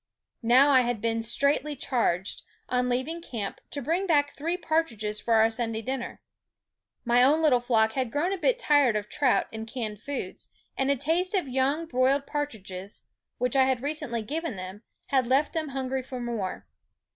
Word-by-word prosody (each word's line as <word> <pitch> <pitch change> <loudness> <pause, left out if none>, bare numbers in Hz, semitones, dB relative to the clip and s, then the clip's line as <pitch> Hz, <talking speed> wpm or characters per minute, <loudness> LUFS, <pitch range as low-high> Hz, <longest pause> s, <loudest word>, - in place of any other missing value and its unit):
Now 255 +5 +5
I 260 -2 +6
had 240 -2 -1
been 230 +1 0
straitly 280 +6 +1
charged, 215 -9 -1 0.3
on 250 0 +1
leav 250 +2 0
ing 335 +1 -5
camp, 220 -11 -5
to 285 - -4
bring 340 +8 0
back 290 -4 +3
three 335 +5 -3
partridges 230 - -1
for 230 - +1
our 220 +1 +5
Sunday 225 -1 -2
dinner. 260 0 -5 0.8
My 240 +1 +4
own 295 +5 +4
little 270 -6 +5
flock 225 -2 +2
had 255 0 -2
grown 340 +8 0
a - - -2
bit - - +2
tired 290 - +3
of 210 -1 -3
trout 270 -4 +2
and 220 0 -6
canned 220 -4 -5
foods; 285 +3 -5 0.3
and 265 0 0
a 280 - +4
taste 345 - 0
of 365 -7 0
young 265 +5 +1
broiled 270 0 +2
partridges, 200 -10 -5 0.3
which 250 +1 -1
I 265 -1 +5
had 260 -1 0
recently 265 -6 -2
given 310 +2 -3
them, 185 +2 -7 0.3
had 260 -3 +2
left 270 +4 +2
them 320 -2 -1
hungry 265 -1 -2
for 255 0 -7
more. 230 -6 -4
255 Hz, 180 wpm, -27 LUFS, 230-290 Hz, 0.8 s, I